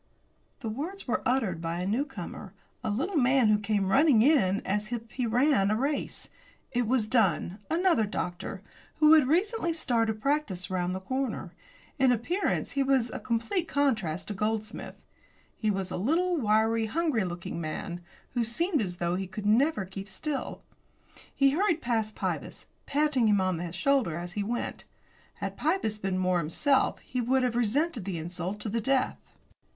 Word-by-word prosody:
The 235 - -4
words 315 - -5
were 245 - 0
uttered 225 -10 0
by 165 +1 -2
a 180 - -2
newcomer 210 -4 -4 0.3
a - - -1
little 315 - -1
man 260 -3 +4
who 210 -1 +4
came 200 -2 0
running 270 -3 +5
in 235 -10 +3
as 210 +3 -1
if 230 -2 -5
he 250 -2 -1
ran 245 -3 +3
a 215 - +2
race. 280 +6 -2 0.4
It 245 -3 0
was 240 -3 +1
Dunn, 200 -4 +1
another 335 - +3
doctor, 180 -3 -4 0.3
who 305 0 +6
had 305 -5 +6
recently 360 - +1
started 230 -8 0
practice 235 -10 -1
round 180 0 -1
the - - -3
corner. 260 +4 -3 0.5
In 260 -1 +5
appearance 290 - 0
he 280 - 0
was 265 -3 +2
a - - -5
complete 255 - -1
contrast 220 - 0
to - - -2
Goldsmith. 215 +2 -3 0.6
He 215 - -1
was 190 -2 -2
a - - -2
little, 335 - +1
wiry, 220 -3 +2
hungry 305 - +1
looking 175 -1 -5
man, 170 +3 -4 0.3
who 240 -1 0
seemed 305 - 0
as 180 -4 -3
though 175 0 0
he 190 0 -3
never 225 +3 +3
could 185 - -13
keep 195 +1 -6
still. 290 +7 -4 0.7
He 275 -1 +4
hurried 340 +1 +2
past 225 -5 -1
Pybus, - - -4 0.2
patting 285 -5 +2
him 205 -2 +4
on 185 -2 +1
the 170 0 -4
shoulder 245 - +1
as 175 +1 -5
he 205 - -2
went. 235 +4 -3 0.5
Had - - -5
Pybus 295 - 0
been 190 -2 -1
more 185 -1 +2
himself 260 - +1
he 255 - -3
would 255 +2 +2
have 245 -2 0
resented 245 - 0
the 190 -4 -3
insult 175 +4 -4
to 215 - -2
the 230 +2 -1
death. 265 +3 +1
225 Hz, 170 wpm, -28 LUFS, 195-275 Hz, 0.7 s, who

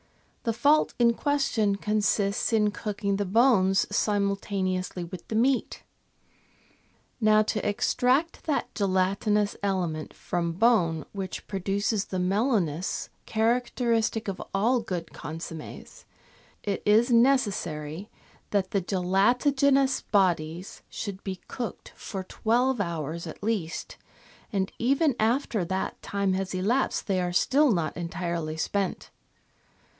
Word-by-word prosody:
The 230 - 0
fault 290 +7 +3
in 235 -1 +4
question 250 -7 +1
consists 205 0 0
in 210 -2 +3
cooking 205 -1 -2
the 205 - -1
bones 195 -2 +4
simultaneously 195 -3 -1
with 170 0 -9
the 220 - -4
meat. 255 +3 +1 1.4
Now 215 0 +5
to 215 0 -2
extract 255 +9 +1
that 300 -3 -1
gelatinous 200 +1 +1
element 180 -6 -2
from 170 -1 -2
bone 175 -6 +2
which 190 -2 -5
produces 200 +1 -1
the 185 - -4
mellowness 185 - 0 0.2
character 235 +2 +1
istic 225 -1 +1
of 195 -2 -4
all 235 +6 +3
good 180 -7 -5
consommes, 160 0 -8 0.6
it 200 -2 -2
is 225 +4 +4
necessary 200 - +1 0.4
that 195 -2 0
the 200 - +1
gelatigenous 250 +10 +2
bodies 175 -3 0
should 200 -3 -6
be 190 -2 -5
cooked 240 -3 -6
for 195 -3 -6
twelve 240 +5 +1
hours 170 -2 -4
at 160 - -9
least, 205 -7 -3 0.5
and 195 -1 -1
even 275 +3 +2
after 225 -2 +1
that 190 +2 -3
time 200 -1 -1
has 190 0 -2
elapsed 225 +9 0
they 190 -3 0
are 180 0 -1
still 275 +10 +3
not 170 -6 -1
entirely 170 -2 -3
spent. 195 +4 -2
200 Hz, 120 wpm, -27 LUFS, 185-230 Hz, 1.4 s, Now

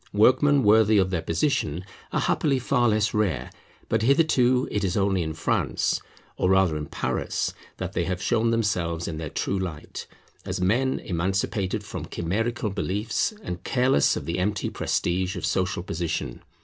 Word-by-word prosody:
Workmen 130 +7 +4
worthy 110 0 +5
of 95 -1 +2
their 90 -3 0
position 85 - -1 0.3
are - - 0
happily 140 -3 +1
far 125 -1 +2
less 105 0 +1
rare; 90 -13 0 0.4
but 110 - +1
hitherto 130 -1 +3
it 105 - -1
is 95 0 0
only 95 -2 +2
in 80 -1 -3
France, - - 0 0.4
or 90 - +1
rather 95 -4 +4
in 75 -1 -4
Paris, - - -2 0.2
that - - -4
they 85 - 0
have 90 0 -2
shown 115 +3 +1
themselves 90 -7 0
in 80 - -4
their 80 -2 -4
true 95 +6 -2
light, 85 -5 -6 0.4
as - - -4
men 120 +9 +2
emancipated 95 +3 -1
from - - -6
chimerical 105 +5 -2
beliefs, 105 - -1
and 90 0 -5
careless 125 - +3
of - - -5
the 85 +2 -2
empty 100 +2 -1
prestige 90 +2 -1
of 90 - -3
social 95 -1 0
position. 85 -3 -3
95 Hz, 160 wpm, -25 LUFS, 85-115 Hz, 0.4 s, worthy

